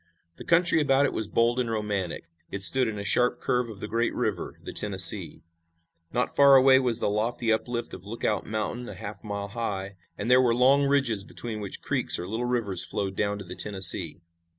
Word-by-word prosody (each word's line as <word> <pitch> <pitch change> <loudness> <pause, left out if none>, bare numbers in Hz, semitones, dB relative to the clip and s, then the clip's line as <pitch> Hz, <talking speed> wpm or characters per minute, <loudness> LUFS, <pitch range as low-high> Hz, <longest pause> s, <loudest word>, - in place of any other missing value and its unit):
The - - -10
country 170 -1 +3
about 140 -1 +2
it - - -2
was 110 - -2
bold 115 +3 0
and 120 -2 -2
romantic. 105 -5 -3 0.3
It 100 - -4
stood 130 +5 +3
in 110 -1 -5
a 100 - -5
sharp 125 +3 +2
curve 125 -1 -1
of 105 -3 -11
the - - -5
great 115 +1 -2
river, - - -4
the - - -8
Tennessee. - - +3 0.7
Not 125 - -2
far 140 -1 +6
away 130 0 +6
was 125 -4 0
the - - -2
lofty 115 +2 -1
uplift 120 +1 -4
of 95 +2 -10
Lookout 110 -1 -3
Mountain, 110 +3 -5
a - - -9
half 105 -1 -9
mile 100 -1 -6
high, 100 -3 -5 0.2
and 115 +5 -2
there 125 +1 +6
were 120 -2 +1
long 135 +3 +3
ridges 130 -8 +1
between 110 +1 -6
which 100 - -6
creeks - - +1
or 90 - -6
little 115 +4 -3
rivers 115 -6 -1
flowed 95 -2 -3
down 100 0 -2
to 100 - -9
the 90 - -9
Tennessee. 95 -5 +4
115 Hz, 205 wpm, -25 LUFS, 100-125 Hz, 0.7 s, far